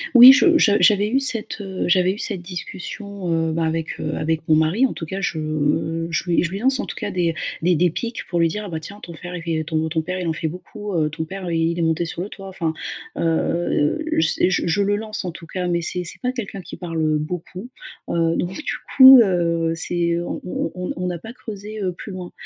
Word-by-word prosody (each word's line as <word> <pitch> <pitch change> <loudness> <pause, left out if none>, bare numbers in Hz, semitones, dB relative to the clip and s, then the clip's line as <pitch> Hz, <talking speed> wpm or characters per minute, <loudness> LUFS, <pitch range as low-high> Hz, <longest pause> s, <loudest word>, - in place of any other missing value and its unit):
Oui, 250 +2 +12
je 330 +4 +5
je 220 - +4
j'avais 205 -1 +5
eu 265 +4 +2
cette, 225 -5 -1
heu, 190 -1 -4
j'avais 185 0 +3
eu 205 - -5
cette 195 -5 -3
discussion, 185 +2 -6 0.2
heu, - - -1
bah, 165 - 0
avec, 160 0 -2
heu, 155 - -2
avec 160 0 -1
mon 155 - +6
mari. 160 +12 +3
En - - 0
tout 160 - -6
cas, 190 +4 -5
je 160 0 -1
je 165 - -1
lui 175 -1 +2
je 170 - -2
lui 195 - -4
lance, 265 +3 +2
en - - -4
tout - - -7
cas, - - -3
des 175 -3 0 0.3
des 175 +1 +3
des 175 +3 +3
pics 230 +8 -5
pour 175 - -1
lui 165 - +4
dire: 210 +5 -4
«Ah - - -7
bah 160 -2 -4
tiens, 200 +5 -9
ton 170 - -9
frère, 175 +2 -8
il - - -7
fait 160 -2 -1
ton 160 0 -1
ton 160 0 -1
père, 180 +3 -4
il 180 - -3
en 165 - 0
fait 160 - -3
beaucoup, 205 +4 -7
heu, 155 -3 +1
ton 160 +2 -4
père, 190 +3 -7
heu, 170 - -2
il 165 +1 0
est - - +1
monté 160 +1 +1
sur 165 - -5
le 190 - -3
toit», 195 -1 -10
enfin, 165 -3 -2 0.4
heu, 165 -2 +1 0.2
c'est 160 +3 +2
je 175 - 0
je 190 +5 +2
le 205 +1 +2
lance 215 -1 -5
en 180 - -3
tout 165 0 -11
cas. 180 +1 -3
Mais, 170 -1 0
c'est 180 +2 -1
c'est 160 - -6
pas 250 -1 0
quelqu'un 205 -6 -5
qui 175 - -9
parle, 165 -2 -4
heu, 155 -1 +2
beaucoup, 180 +7 -6 0.4
heu, 165 -1 +1
donc 180 +2 -2
du 305 - -3 0.2
coup, 265 -1 +11
heu, 170 -5 +1
c'est 170 0 +1
on 175 - -4
on 175 -2 -3
on 180 0 -3
on 180 - -2
n'a 175 -1 -2
pas 225 +7 -9
creusé, 215 -3 -8
heu, 185 -2 -1
plus 200 - -9
loin. 180 -1 -7
175 Hz, 255 wpm, -21 LUFS, 165-200 Hz, 0.4 s, Oui